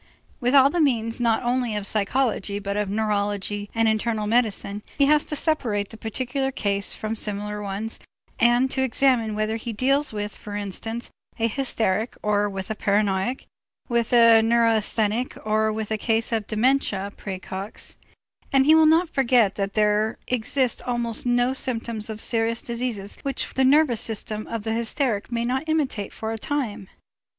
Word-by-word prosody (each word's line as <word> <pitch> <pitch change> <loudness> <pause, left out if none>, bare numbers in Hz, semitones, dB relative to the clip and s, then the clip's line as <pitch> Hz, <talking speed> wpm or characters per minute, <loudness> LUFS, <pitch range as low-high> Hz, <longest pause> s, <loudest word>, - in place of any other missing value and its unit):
With 250 +2 +1
all 275 0 +7
the 345 - +1
means 230 -5 +1
not 230 -1 +2
only 245 -2 0
of 205 -1 -2
psychology 210 -1 0
but 200 0 -4
of 210 -1 -1
neurology 205 -1 -1
and 225 0 +3
internal 220 0 0
medicine, 210 -2 0 0.2
he 280 - +4
has 300 +1 +4
to 300 - -4
separate 235 -10 0
the - - -10
particular 255 +5 -2
case 200 -5 -1
from 220 +1 -4
similar 210 -1 -4
ones 205 +3 -3 0.4
and 240 +2 +3
to 265 - +1
examine 250 -4 +2
whether 215 +1 -1
he 230 +1 -5
deals 275 +6 +2
with, 210 -1 -4
for 205 - -8
instance, 215 +3 -4 0.3
a 230 -1 +1
hysteric 225 -3 -1
or 205 0 +1
with 195 +1 -5
a - - -2
paranoiac, 205 +3 0 0.4
with 235 -1 0
a 230 -2 +7
neurasthenic 225 0 +1
or 215 0 +2
with 220 0 -4
a 215 - -1
case 225 +1 0
of 220 -3 -1
dementia 215 -4 +1
præcox; 190 +1 -7 0.6
and 270 -1 +4
he 310 - +6
will 320 0 +6
not 330 +3 +4
forget 245 -8 +3
that 195 -1 -3
there 210 +1 +2
exist 250 +1 0
almost 240 -1 -2
no 245 +1 +2
symptoms 230 -4 -2
of 215 -1 -5
serious 230 0 0
diseases 235 -4 -3
which 275 -1 -3
the 265 - +2
nervous 265 -4 +4
system 215 -2 -2
of 230 -2 -4
the 220 0 -1
hysteric 235 -1 -1
may 235 0 -1
not 265 +6 -2
imitate 280 -10 -1
for 220 0 -5
a 225 - -4
time. 230 -8 -3
225 Hz, 165 wpm, -24 LUFS, 210-250 Hz, 0.6 s, all